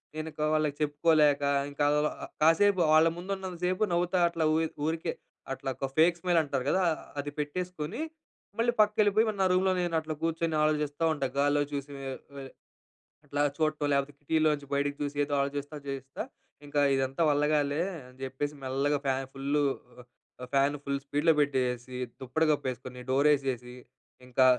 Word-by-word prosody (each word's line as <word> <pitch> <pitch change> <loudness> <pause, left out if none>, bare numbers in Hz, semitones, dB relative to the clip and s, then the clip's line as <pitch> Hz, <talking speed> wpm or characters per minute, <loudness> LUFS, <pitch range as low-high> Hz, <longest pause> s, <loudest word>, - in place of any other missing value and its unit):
నేను 155 0 -4
ఇంక - - -7
వాళ్ళకి 155 -2 +1
చెప్పుకోలేక, 150 -1 +3 0.3
ఇంకలాలా 150 +1 +2
ఆహ్, - - -15
కాసేపు 180 +4 +5
వాళ్ళ 160 +1 +6
ముందున్నంతసేపు, 185 0 -2
నవ్వుతా 175 +1 +1
అట్లా, 165 -1 -2
ఊయిద్ 160 0 -1
ఊరికే, 165 +1 -1 0.4
అట్లా 135 - -5
ఒక 135 - -2
ఫేక్ 170 +2 +5
స్మైల్ 175 -1 +3
అంటారు 140 -3 -2
కదా! 190 +5 +2 0.4
అది 145 0 -6
పెట్టేసుకొని, 180 - -3 0.6
మళ్ళీ 235 +1 +3
పక్కకెళ్ళిపోయి, 210 0 +3
మరి 205 -2 -4
నా - - +4
రూమ్‌లో 190 +1 +3
నేనట్లా 160 -2 -1
కూర్చొని, 165 0 -1
ఆలోచిస్తా 150 0 0
ఉంటా. 140 -2 -1
గాల్లో 145 +1 +3
చూసి 140 0 -4 0.2
ఆహ్, 130 - -7 0.2
ఆహ్, 135 - -10 0.7
అట్లా 145 0 -2 0.2
చూడటం, 155 -2 0
లేకపోతే 140 +1 0
కిటీలోంచి 150 -1 +1
బయటికి 140 0 0
చూసి, 145 0 -4
ఏదో 145 0 -3
ఆలోచిస్తా, 145 +2 -3
చేస్తా. 135 0 -5 0.4
ఇంకా 145 0 0
ఇదంతా 135 +3 -1
వల్లగాలే, 145 +1 +2 0.2
అని 125 0 -16
జెప్పేసి 145 +3 -3
మెల్లగా 135 +3 +1
ఫ్యాన్ 135 0 0
ఫుల్లు 140 +2 0 0.4
ఆహ్, - - -11 0.4
ఆహ్, 125 - -7
ఫ్యాన్ 140 +1 +3
ఫుల్ 140 0 -1
స్పీడ్‌లో 150 +4 +3
పెట్టేయేసి, 125 -3 -1 0.2
దుప్పటి 135 +5 0
కప్పేసుకుని, 130 -3 -3
డోరేసేసి, 135 -3 +1 0.5
ఇంకా 130 +1 +3
145 Hz, 150 wpm, -29 LUFS, 140-165 Hz, 0.7 s, వాళ్ళ